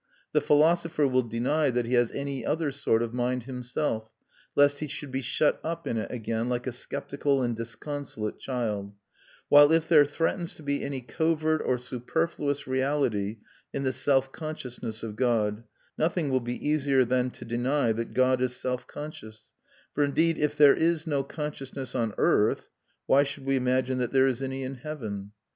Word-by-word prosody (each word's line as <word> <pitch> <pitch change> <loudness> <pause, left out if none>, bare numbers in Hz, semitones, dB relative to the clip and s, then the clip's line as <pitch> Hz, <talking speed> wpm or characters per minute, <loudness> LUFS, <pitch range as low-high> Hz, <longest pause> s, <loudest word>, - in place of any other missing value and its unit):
The - - +3
philosopher 160 0 +3
will 130 -1 +3
deny 125 +6 0
that 120 -1 0
he 120 - -3
has 120 -2 +3
any 140 -2 -4
other 155 -1 0
sort 125 -4 +1
of 115 0 -4
mind 125 0 -1
himself, 125 -2 -2 0.5
lest 145 0 +4
he 150 - -3
should 140 0 -6
be 135 +1 -2
shut 130 +4 +1
up 165 +1 -4
in 115 - -1
it - - -4
again, 115 0 -2
like 120 -1 -1
a 130 - -2
sceptical 140 +2 -1
and 120 -1 0
disconsolate 115 -1 -5
child; 105 -6 -3 0.5
while 145 +1 +8
if 165 0 +3
there 155 -3 +7
threatens 165 +4 -2
to 155 - -12
be 140 0 -1
any 140 -2 -3
covert 155 +3 0
or 125 - +1
superfluous 140 +4 -2
reality 130 -6 0 0.4
in 140 - -2
the 130 - +1
self 135 +1 +2
consciousness 125 -8 -6
of 110 -2 -5
God, 115 -2 +1 0.3
nothing 160 -2 +1
will 130 - +3
be 120 0 -4
easier 140 -3 +3
than 125 +1 +1
to - - -10
deny 120 +2 +1
that 115 +1 -4
God 130 0 +3
is 125 -1 0
self 125 0 -3
conscious; 110 -8 -9 0.5
for 145 - +2
indeed, 160 +4 +2
if 150 0 0
there 145 -2 +8
is 165 -1 +1
no 145 -4 0
consciousness 140 -2 -6
on 115 -4 -1
earth, - - +2 0.4
why 140 - +5
should 140 -1 -4
we 135 0 +2
imagine 130 0 +1
that 125 -2 -1
there 135 -1 +5
is 130 -1 0
any 135 0 -3
in 130 +1 -5
heaven? 110 -9 -6
130 Hz, 180 wpm, -27 LUFS, 120-145 Hz, 0.5 s, while